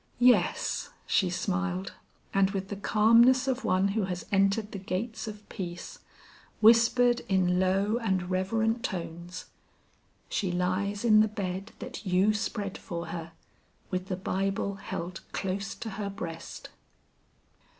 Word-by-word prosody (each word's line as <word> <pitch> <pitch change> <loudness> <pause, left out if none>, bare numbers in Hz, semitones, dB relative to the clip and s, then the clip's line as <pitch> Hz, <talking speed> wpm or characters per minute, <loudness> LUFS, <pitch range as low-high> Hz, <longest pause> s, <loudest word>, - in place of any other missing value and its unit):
"Yes," 245 0 +3 0.2
she 185 - +2
smiled; 185 +1 -2 0.4
and 195 -1 +4
with 195 -1 -4
the 205 - -3
calmness 230 +6 +5
of 265 -1 0
one 190 +2 +2
who 205 0 0
has 180 -1 -4
entered 200 +2 +2
the 200 - -5
gates 220 +5 -3
of 210 -1 -8
peace, 175 -2 -6 0.6
whispered 235 +2 +5
in 180 -2 +3
low 195 +4 +2
and 190 -5 -1
reverent 220 +5 +1
tones: 175 0 -5 0.8
"She 190 -3 -1
lies 190 +4 -1
in 215 -2 +7
the 215 - +5
bed 195 -1 -4
that 255 -1 -7
you 190 +2 +3
spread 210 -2 -3
for 170 -1 -5
her, 165 -1 -6 0.6
with 185 0 -2
the 185 - -2
Bible 195 +1 -1
held 180 -1 -5
close 195 +1 -3
to 230 -2 -6
her 200 - -2
breast." 165 -4 -7
195 Hz, 135 wpm, -29 LUFS, 185-215 Hz, 0.8 s, in